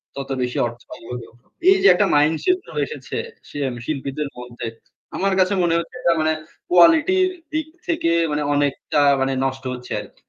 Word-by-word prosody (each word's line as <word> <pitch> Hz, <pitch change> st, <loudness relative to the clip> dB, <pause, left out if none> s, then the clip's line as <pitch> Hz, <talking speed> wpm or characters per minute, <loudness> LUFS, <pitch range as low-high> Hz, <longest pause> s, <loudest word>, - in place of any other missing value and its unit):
তত 140 Hz, 0 st, -6 dB
বেশি 125 Hz, 0 st, -2 dB
অর্থ 120 Hz, 0 st, -9 dB
হবে। 125 Hz, -1 st, -8 dB, 0.4 s
এই 385 Hz, -, +6 dB
যে -, -, +7 dB
একটা 205 Hz, -, +3 dB
মাইন্ড 150 Hz, +2 st, +4 dB
সেট 365 Hz, 0 st, +3 dB, 0.3 s
এসেছে 460 Hz, -, -7 dB, 0.7 s
শিল্পীদের 140 Hz, 0 st, -3 dB
মধ্যে। 120 Hz, -1 st, -7 dB, 0.5 s
আমার 195 Hz, 0 st, +1 dB
কাছে 185 Hz, +2 st, +3 dB
মনে 170 Hz, -1 st, +2 dB
হচ্ছে 170 Hz, +8 st, -7 dB
এটা 170 Hz, -, +3 dB
মানে 155 Hz, 0 st, +2 dB, 0.4 s
কোয়ালিটির 320 Hz, -, +5 dB, 0.3 s
দিক 315 Hz, 0 st, -1 dB, 0.2 s
থেকে 315 Hz, -, +1 dB, 0.2 s
মানে 150 Hz, -, 0 dB
অনেকটা 145 Hz, 0 st, +1 dB, 0.2 s
মানে 135 Hz, 0 st, +1 dB
নষ্ট 135 Hz, 0 st, -3 dB
হচ্ছে 125 Hz, 0 st, -9 dB
আরকি। -, -, -16 dB
155 Hz, 160 wpm, -21 LUFS, 135-200 Hz, 0.7 s, যে